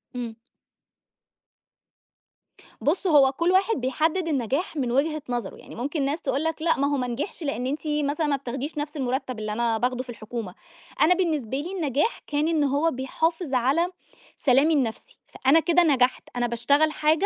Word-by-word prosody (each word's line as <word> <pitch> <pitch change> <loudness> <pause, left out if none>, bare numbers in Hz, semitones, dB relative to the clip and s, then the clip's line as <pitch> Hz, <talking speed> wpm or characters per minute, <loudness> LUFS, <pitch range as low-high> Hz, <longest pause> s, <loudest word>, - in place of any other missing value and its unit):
امم. 235 -2 -4 2.5
بُص، 360 +6 +1
هو 285 -5 +6
كل 335 +6 +1
واحد 390 +4 +3
بيحدد 315 +7 0
النجاح 275 - -1
من 250 -4 -1
وجهة 305 +4 +1
نظره، 240 -1 -3
يعني - - -12
ممكن 280 +4 -2
ناس 290 +4 -1
تقول 280 - -1
لك 320 -1 -2
لأ، 325 0 +2
ما 280 - +2
هو - - +1
ما 250 -1 -1
نجحش، 275 - -4
لأن 265 -4 -2
أنتِ 285 +3 -2
مثلًا 300 +1 0
ما 290 - +2
بتاخديش 270 +3 -5
نفس 300 +1 -4
المرتب 255 -2 -2
اللي 215 -1 -3
أنا 230 0 +1
باخده 250 +2 -1
في 255 - -18
الحكومة. 220 -3 -6 0.5
أنا 315 +4 +6
بالنسبة 305 - -1
لي 315 +6 -4
النجاح، 315 - 0
كان 295 +1 0
إن 320 -3 +2
هو 285 +4 +2
بيحافظ 320 +4 -2
على 270 +7 +2 0.5
سلامي 280 +3 +4
النفسي، 250 -7 -2
فأنا 275 +5 +3
كده 345 +1 +4
نجحت، 260 -5 +2
أنا 245 0 +1
باشتغل 280 +7 +2
حاجة 310 +4 +2
285 Hz, 170 wpm, -25 LUFS, 250-320 Hz, 2.5 s, هو